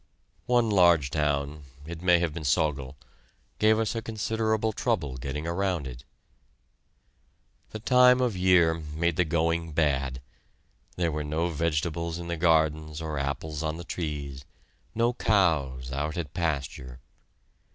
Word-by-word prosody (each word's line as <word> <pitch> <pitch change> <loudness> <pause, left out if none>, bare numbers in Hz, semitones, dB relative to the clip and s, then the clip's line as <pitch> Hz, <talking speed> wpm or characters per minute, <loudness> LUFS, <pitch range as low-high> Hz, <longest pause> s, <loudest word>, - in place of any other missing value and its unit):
One 120 -1 +3
large 85 -7 +4
town 75 -1 -1 0.2
it 85 +1 -7
may 90 -1 +5
have 85 -3 -1
been 85 - -6
Sögel 70 -1 0 0.6
gave 110 +1 +4
us 110 +1 -1
considerable 110 0 -1
trouble 90 - -1
getting 70 +4 -5
around 85 -2 -1
it. 65 -1 -9 1.6
The - - -6
time 125 +2 +5
of 125 -5 +1
year 90 -3 +4
made 80 +1 -2
the 90 - +2
going 85 0 0
bad. 70 -4 0 0.8
There 85 -2 0
were 75 0 -3
no 80 +4 -1
vegetables 85 +1 -1
in 85 0 -7
the 85 - -1
gardens 80 -2 +1
or 80 -3 -3
apples 70 +2 -3
on 80 0 -2
the 85 - -7
trees; 75 -6 -5 0.5
no 115 +2 +2
cows 75 - +1
out 75 +4 -3
at 75 -5 -4
pasture. 70 -6 -3
80 Hz, 135 wpm, -27 LUFS, 75-90 Hz, 1.6 s, may